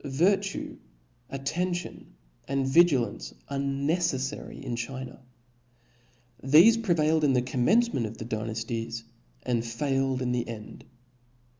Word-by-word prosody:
Virtue, 195 +8 0 0.5
attention, 175 - -4 0.3
and 135 -1 0
vigilance, 140 -5 +2
are 140 -1 -3
neceffary 140 0 -1
in 120 - -3
China; 130 +3 -6 1.2
thefe 170 - +6
prevailed 160 -6 +2
in 140 -2 +4
the 125 - +3
cofh* 125 -1 -2
mencement 225 - +3
of 110 +1 -9
the 110 - -6
Dynafties, 115 +1 -4 0.4
and 120 -2 0
failed 135 +2 -1
in 125 - -1
the 125 -1 -1
end. 110 -2 -9
135 Hz, 115 wpm, -27 LUFS, 120-160 Hz, 1.2 s, thefe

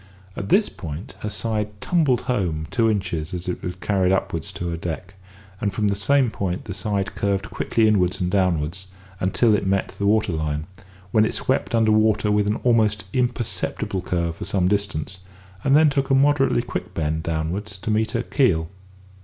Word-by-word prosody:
At 100 - -5
this 210 +1 +4
point 95 - -7
her 105 - -3
side 105 -1 -2
tumbled 150 - +2
home 90 - -1
two 115 -1 +3
inches 90 -5 -2
as 90 0 -6
it 90 - -3
was 90 0 -4
carried 95 0 +1
upwards 95 -1 -1
to 90 -2 -4
her 85 - -2
deck, 90 +3 -5 0.5
and 100 - 0
from 105 +2 0
the 100 - 0
same 130 +4 +3
point 90 -4 -3
the 100 - -5
side 100 +1 -2
curved 100 0 -1
quickly 115 -1 +1
inwards 95 -4 +2
and 90 0 -1
downwards 90 -1 0 0.3
until 105 +5 +3
it 100 -2 +1
met 95 0 +1
the 100 - -2
water 110 -2 +3
line, 75 -1 -2 0.5
when 110 - +4
it 110 - 0
swept 130 -2 0
under 110 -1 +4
water 110 -1 +3
with 105 0 +2
an 105 - +1
almost 110 -5 +3
imperceptible 120 -6 -1
curve 85 -2 -2
for - - -6
some 90 -3 +1
distance, 95 -2 -1 0.4
and 135 +2 +5
then 155 -1 +5
took 135 -1 0
a 135 - +4
moderately 135 -3 +3
quick - - -5
bend 80 0 -1
downwards 85 +6 -3
to 105 +3 -3
meet 110 +1 +1
her 120 0 0
keel. 85 - +1
100 Hz, 185 wpm, -23 LUFS, 90-110 Hz, 0.5 s, and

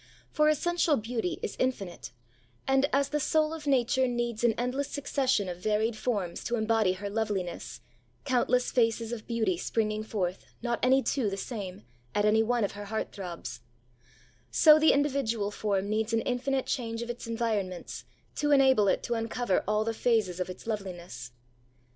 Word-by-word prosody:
For 305 -1 +3
essential 330 0 +2
beauty 225 -4 -2
is - - -3
infinite; 195 - -2 0.6
and, 270 +1 +3
as 280 0 +2
the 300 - 0
soul 310 +2 +2
of 310 -2 -7
Nature 260 -1 +3
needs 240 -2 -2
an 235 -1 +4
endless 250 +4 -1
succession 265 -7 0
of 175 -1 -5
varied 215 +3 +1
forms 210 -6 -2
to 240 - 0
embody 220 -4 +2
her 200 +2 -6
loveliness, 200 - -3 0.4
countless 250 -1 +2
faces 230 -1 +1
of 230 -3 -6
beauty 220 -7 0
springing 215 +2 -1
forth, 190 -4 -3 0.2
not 240 -1 -1
any 265 +1 +4
two 255 -7 0
the 195 - -4
same, 195 - -6 0.3
at 205 - +2
any 215 +1 +4
one 235 +1 +1
of 200 - 0
her 205 0 -8
heart 220 +2 -3
throbs; 170 - -7 0.9
so 305 - +7
the 315 - +6
individual 260 -8 0
form 200 -2 -1
needs 220 +2 -1
an 225 - +3
infinite 260 +2 -1
change 230 -3 -2
of 235 - -8
its 240 -1 -8
environments, 220 -6 -2 0.3
to 295 - +1
enable 265 -7 +5
it - - +1
to 240 - -1
uncover 225 -2 0
all 210 +1 +2
the 225 +1 -1
phases 220 -6 +1
of 180 - -2
its 185 - -9
loveliness. 175 - -5
225 Hz, 170 wpm, -29 LUFS, 205-255 Hz, 0.9 s, so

